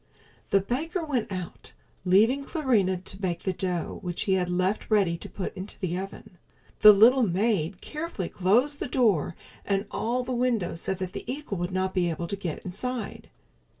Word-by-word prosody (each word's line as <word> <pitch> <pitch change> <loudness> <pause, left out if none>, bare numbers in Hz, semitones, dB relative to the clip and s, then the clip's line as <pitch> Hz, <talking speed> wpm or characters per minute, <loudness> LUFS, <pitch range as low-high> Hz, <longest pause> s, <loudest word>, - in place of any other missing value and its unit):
The 195 - +4
baker 320 - -2
went 255 -9 -1
out, 180 -2 -6 0.3
leaving 220 +10 +4
Clarinha 235 - +1
to 190 - -3
bake 180 -3 -2
the 190 - 0
dough 180 -2 -3
which 175 -2 -2
he 195 - +1
had 180 -2 +1
left 185 +4 0
ready 200 -6 +3
to - - -8
put 195 - -5
into 190 +2 -6
the 180 -3 -2
oven. 195 0 -7 0.4
The 210 - +11
little 230 +6 +6
maid 195 -3 +1
carefully 305 - -4
closed 240 +10 +2
the - - -2
door 215 - +2 0.3
and 195 0 0
all 245 +3 -1
the 250 - -5
windows 235 -9 0
so 190 - -1
that 185 0 -5
the - - -5
eagle 265 -9 -4
would 175 +1 -2
not 185 0 -1
be 175 -2 +1
able 170 +1 -3
to - - -1
get 180 -4 -5
inside. 240 +6 -4
195 Hz, 185 wpm, -27 LUFS, 180-245 Hz, 0.4 s, The